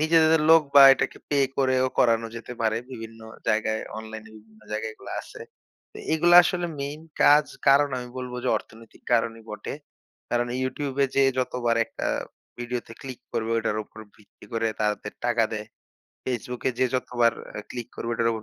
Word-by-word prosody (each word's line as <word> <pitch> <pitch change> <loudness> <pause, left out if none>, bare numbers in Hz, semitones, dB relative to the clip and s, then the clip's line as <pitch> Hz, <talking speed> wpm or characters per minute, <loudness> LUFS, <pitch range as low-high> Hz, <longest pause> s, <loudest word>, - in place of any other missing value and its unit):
নিজেদের 160 0 +4
লোক 165 -1 +8
বা 140 - +10
এটাকে - - -3
পে 145 - +1 0.2
করেও 130 -1 +2
করানো 115 -1 +3
যেতে 115 +1 -8
পারে। 110 -1 +1
বিভিন্ন 115 -2 -9 0.3
জায়গায় 110 0 +1 0.2
অনলাইনে 110 0 -9
বিভিন্ন 110 0 -19
জায়গায় 110 +1 -3
এগুলা - - -10
আছে। - - -13 0.5
তো - - -10
এগুলা 175 +2 +5
আসলে 175 0 -1
মেইন 145 +2 -4 0.2
কাজ 145 0 +6 0.2
কারণ 140 +1 +6
আমি 125 0 -7
বলবো 125 -1 -5
যে, - - +1
অর্থনৈতিক 115 0 -17
কারণই 115 -1 +1
বটে। 105 -1 -6 0.6
কারণ 120 0 +1 0.2
YouTube 135 +1 -3
এ - - +2
যেয়ে 135 -1 +4
যতবার 120 -2 0
একটা - - -5 0.5
ভিডিওতে 120 -1 -5
ক্লিক 130 -3 -8
করবে 110 0 -2
ওটার 110 -2 -1
উপর 110 - -17 0.2
ভিত্তি 105 - -19
করে 115 0 0
তাদের 105 0 -1
টাকা 120 -2 +3
দেয়। 105 -1 -4 0.6
Facebook 125 0 -4
এ - - +1
যে, 130 - +3
যতবার 120 -2 +1 0.2
অ্যা 105 - -5
ক্লিক 120 -2 -6
করবে 115 - -4
ওটার 115 0 +1
উপর 110 -1 -5
120 Hz, 175 wpm, -25 LUFS, 110-135 Hz, 0.6 s, বা